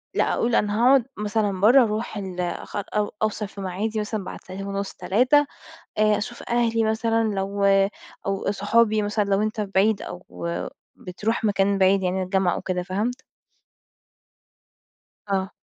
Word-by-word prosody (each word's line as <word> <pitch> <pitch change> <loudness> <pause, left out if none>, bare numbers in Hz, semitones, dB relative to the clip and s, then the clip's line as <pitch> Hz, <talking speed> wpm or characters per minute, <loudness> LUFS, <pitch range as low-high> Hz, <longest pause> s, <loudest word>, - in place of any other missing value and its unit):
لأ - - +2
قُل 235 0 +1
أنا 205 0 +1
هاقعد 270 -3 +5
مثلًا 205 -2 -1
برّه، 245 +6 +7
أروح 215 0 -2
ال 185 -2 -6
أ 175 -1 -3
أو 205 +1 -2
أوصل 215 0 -1
في 200 0 -10
معادي 205 +4 -2
مثلًا 210 -1 -3
بعد - - -7
ساعتين 195 +2 -6
ونُص 200 0 -3
3، 250 +11 +3 0.5
آآ 215 -1 +4
أشوف 235 +3 -6
أهلي 230 -1 +2
مثلًا 225 +1 +1
لو 200 +1 -1 0.6
أو 195 0 -1
صحابي 215 +2 +2
مثلًا 205 +1 0
لو 200 +1 +1
أنت 215 +1 -2
بعيد 200 +1 +1
أو 180 - -7 0.7
بتروح 210 +6 -3
مكان 200 -1 +2
بعيد 190 +1 +4
يعني 185 +1 0
الجامعة 185 -1 +1
أو - - -5
كده، 180 -1 -2
فهمت؟ 215 +8 -3 2.1
آه. 190 0 0
205 Hz, 150 wpm, -24 LUFS, 195-220 Hz, 2.1 s, برّه